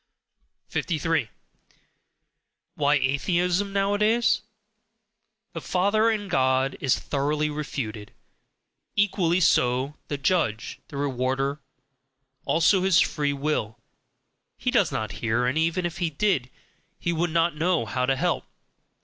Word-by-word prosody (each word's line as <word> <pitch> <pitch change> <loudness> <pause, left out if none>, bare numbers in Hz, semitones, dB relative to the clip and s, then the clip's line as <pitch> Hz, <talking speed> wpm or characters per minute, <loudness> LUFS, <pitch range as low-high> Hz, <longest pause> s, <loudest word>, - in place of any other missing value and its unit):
53. 160 - -1 1.4
Why 145 0 +2
Atheism 175 +8 +1
nowadays? 205 +4 +2 1.1
"The - - -5
father" 205 +5 +2
in 210 -2 -1
God 130 -4 +1
is 135 -3 +2
thoroughly 150 +2 -1
refuted; 115 -8 -5 0.8
equally 185 -4 +2
so 130 -4 +2
"the 145 - -3
judge," 140 - -1
"the 140 - -8
rewarder." 135 +1 -1 0.9
Also 170 +4 +3
his 190 -2 +4
"free 145 -2 +1
will": 140 -7 -2 0.8
he - - -1
does - - +3
not 110 -2 -3
hear 115 +1 +1
and 125 +3 0
even 165 +3 +1
if 175 +1 -4
he 175 -2 0
did, 145 -6 0 0.5
he 170 - -2
would 170 +2 0
not 165 0 +1
know 165 -4 +1
how 125 +4 -1
to 135 - +2
help. - - -1
150 Hz, 115 wpm, -25 LUFS, 130-180 Hz, 1.4 s, his